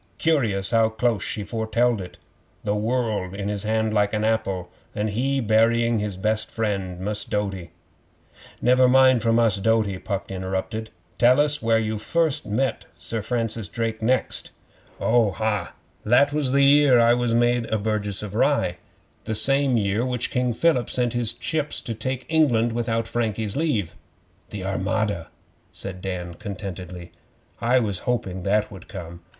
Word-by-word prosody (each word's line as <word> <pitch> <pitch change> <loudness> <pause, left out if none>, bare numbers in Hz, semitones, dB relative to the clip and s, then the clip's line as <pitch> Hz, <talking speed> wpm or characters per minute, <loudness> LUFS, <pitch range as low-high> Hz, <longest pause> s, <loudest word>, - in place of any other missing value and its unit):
Curious 115 -12 +1
how 115 -1 +4
close 110 -1 0
she 105 - -2
foretelled 115 +1 0
it! 90 - -10 0.5
The 105 - 0
world 110 -3 -1
in 100 0 -3
his 105 -1 -1
hand 110 0 0
like 105 -1 +2
an 105 0 0
apple, 100 -5 -1 0.2
an' 105 +1 -1
he 135 +6 0
burying 115 0 +3
his 105 -3 -3
best 110 +2 0
friend, 100 -5 -3
Mus' 105 +3 -2
Doughty 95 -4 -3 0.5
' - - -23
'Never 125 +1 +5
mind 130 -2 +5
for 115 +1 +1
Mus' 115 -2 +3
Doughty,' 105 -2 +1
Puck 100 -1 -4
interrupted. 95 +4 -3 0.3
'Tell 125 +3 +5
us 150 0 +2
where 115 0 +3
you 110 -1 -1 0.5
met 125 +6 -1
Sir 85 +7 -3
Francis 115 -2 -1 0.3
next.' 125 +4 0 0.5
'Oh, 115 -4 +2
ha! 110 -1 -2 0.3
That 135 +6 +4
was 145 -4 0
the 140 +1 +4
year 140 -2 +6
I 115 0 +5
was 120 -1 +1
made 120 0 +2
a 110 - -1
burgess 105 -1 -2
of 105 -2 -6
Rye 120 -7 +1 0.5
the 110 - -2
same 135 +1 +3
year 105 +2 0
which 125 -1 -2
King 125 -1 +1
Philip 130 -1 +2
sent 120 -2 0
his 120 -2 +1
ships 155 -2 -2
to 115 - -4
take 130 +4 -4
England 125 -8 +3
without 115 -1 -1
Frankie's 110 -3 -2
leave.' 115 - -1 0.5
'The 100 -2 -6
Armada!' 95 -2 -1 0.4
said 95 -2 -7
Dan 90 -2 -4
contentedly. 90 -3 -7 0.5
'I 120 +2 +3
was 100 -5 -1
hoping 95 -7 -2
that 105 +3 +1
would 95 -3 -11
come. 85 -3 -9
110 Hz, 155 wpm, -24 LUFS, 100-120 Hz, 0.5 s, year